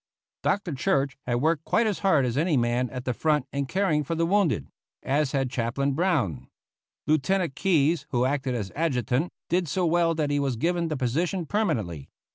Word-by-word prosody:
Dr. 195 Hz, -5 st, 0 dB
Church 135 Hz, 0 st, 0 dB
had 120 Hz, +1 st, 0 dB
worked 160 Hz, -1 st, +2 dB
quite 230 Hz, +7 st, +2 dB
as 210 Hz, -3 st, -1 dB
hard 170 Hz, -9 st, +3 dB
as 120 Hz, -1 st, -2 dB
any 155 Hz, +1 st, +2 dB
man 120 Hz, +1 st, +1 dB
at 125 Hz, -1 st, -7 dB
the 125 Hz, -, 0 dB
front 150 Hz, +3 st, +1 dB
in 140 Hz, -1 st, -1 dB
caring 175 Hz, -3 st, +1 dB
for 165 Hz, +4 st, -3 dB
the 165 Hz, +1 st, +1 dB
wounded; 170 Hz, -, +1 dB, 0.4 s
as 140 Hz, 0 st, +1 dB
had 135 Hz, -3 st, -1 dB
Chaplain 130 Hz, +4 st, -1 dB
Brown. 135 Hz, -, 0 dB, 0.6 s
Lieutenant 155 Hz, +2 st, +1 dB
Keyes, 165 Hz, -1 st, +1 dB
who 125 Hz, -2 st, +1 dB
acted 135 Hz, -1 st, -1 dB
as 105 Hz, -5 st, -4 dB
adjutant, 140 Hz, -, 0 dB, 0.2 s
did 175 Hz, 0 st, +1 dB
so 180 Hz, +5 st, 0 dB
well 165 Hz, 0 st, +2 dB
that 150 Hz, -2 st, -1 dB
he 145 Hz, -, +1 dB
was 135 Hz, -3 st, 0 dB
given 170 Hz, +7 st, 0 dB
the 155 Hz, -2 st, -2 dB
position 160 Hz, +8 st, -1 dB
permanently. 120 Hz, -, -2 dB
145 Hz, 185 wpm, -26 LUFS, 130-170 Hz, 0.6 s, hard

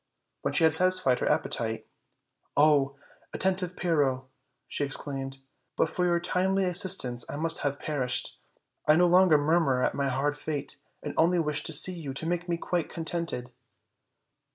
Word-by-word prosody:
When -, -, -2 dB
she 165 Hz, -, +2 dB
had 160 Hz, -1 st, +4 dB
satisfied 185 Hz, -6 st, +3 dB
her -, -, -1 dB
appetite, 110 Hz, -1 st, -2 dB, 0.7 s
"Oh! 145 Hz, -2 st, +3 dB, 0.4 s
attentive 185 Hz, -1 st, -1 dB
Pyrrho!" 140 Hz, -7 st, -1 dB, 0.4 s
she -, -, -3 dB
exclaimed, 135 Hz, -1 st, 0 dB, 0.4 s
"but 160 Hz, -, 0 dB
for 180 Hz, -, -1 dB
your 175 Hz, -1 st, +1 dB
timely 190 Hz, +2 st, 0 dB
assistance 180 Hz, -10 st, +4 dB
I -, -, -5 dB
must 165 Hz, +2 st, +1 dB
have 140 Hz, -1 st, -2 dB
perished; 130 Hz, -5 st, -3 dB, 0.5 s
I 150 Hz, -, +5 dB
no 175 Hz, +2 st, +4 dB
longer 180 Hz, -2 st, +5 dB
murmur 145 Hz, -4 st, +1 dB
at -, -, 0 dB
my 140 Hz, -1 st, -2 dB
hard 140 Hz, +3 st, -1 dB
fate, 145 Hz, -1 st, -5 dB, 0.3 s
and 145 Hz, -, -5 dB
only 175 Hz, +2 st, +3 dB
wish 150 Hz, -3 st, -1 dB
to -, -, -1 dB
see 165 Hz, +4 st, +6 dB
you 150 Hz, -6 st, -7 dB
to 160 Hz, -, -1 dB
make 175 Hz, +1 st, -3 dB
me 170 Hz, -, -1 dB
quite 175 Hz, 0 st, -3 dB
con 165 Hz, -, -7 dB
tented." 160 Hz, -8 st, -4 dB
155 Hz, 165 wpm, -27 LUFS, 140-175 Hz, 0.7 s, see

